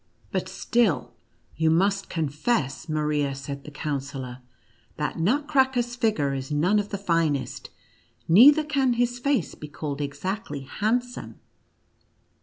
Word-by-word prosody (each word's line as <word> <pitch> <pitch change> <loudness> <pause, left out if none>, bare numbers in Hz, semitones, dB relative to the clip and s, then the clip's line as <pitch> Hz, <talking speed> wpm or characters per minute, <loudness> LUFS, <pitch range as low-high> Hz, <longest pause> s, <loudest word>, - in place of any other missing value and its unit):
" - - -34
But - - -2
still 185 - +1 0.4
you 160 0 +2
must 195 +4 +2
confess," 150 - -1
Maria, 150 -2 0
said 140 +1 -7
the - - -7
Counsellor, 140 -4 -4 0.3
" 115 -1 -35
that 150 +2 -2
Nutcracker's 260 - +2
figure 210 - +1
is 135 -1 -4
none 175 +8 +3
of 205 0 -3
the 200 - -3
finest, 165 -7 -1 0.6
neither 275 - +8
can 275 -5 +1
his 245 +1 0
face 270 - 0
be 150 - -9
called 145 -1 -5
exactly 145 +5 -4
handsome. 245 - -2
165 Hz, 130 wpm, -25 LUFS, 145-240 Hz, 0.6 s, neither